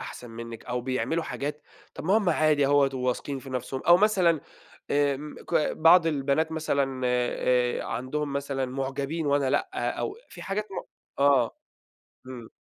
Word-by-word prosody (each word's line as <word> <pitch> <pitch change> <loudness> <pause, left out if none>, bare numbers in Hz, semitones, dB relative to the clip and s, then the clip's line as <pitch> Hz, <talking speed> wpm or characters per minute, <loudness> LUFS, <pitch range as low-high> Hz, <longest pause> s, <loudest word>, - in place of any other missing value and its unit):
أحسن 120 -2 -8
منِّك، 115 0 -8
أو 125 0 -2
بيعملوا 130 +6 -1
حاجات، 150 +1 -4 0.3
طب - - -8
ما 190 +5 +4
هم 205 -4 +1
عادي 155 -3 +3
أهوّة، 140 -1 +4
وواثقين 130 +2 -2
في 135 0 -10
نفسهم، 130 +1 -4
أو 175 0 +8
مثلًا 185 -6 +3 0.5
آمم 145 +1 0
ك - - -5 0.2
بعض 165 +1 +6
البنات 150 +1 0
مثلًا 140 -4 -1
آآ 125 0 +1
عندهم 140 +5 -3
مثلًا 140 -1 -2
معجبين 135 +4 -3
وأنا 140 -2 +2
لأ، 380 - -1
أو 415 - -3
في - - -11
حاجات 200 +2 -2
م - - -7 0.5
آه. 135 -5 +3 0.7
إمم. 125 -3 -9
140 Hz, 150 wpm, -27 LUFS, 130-160 Hz, 0.7 s, أو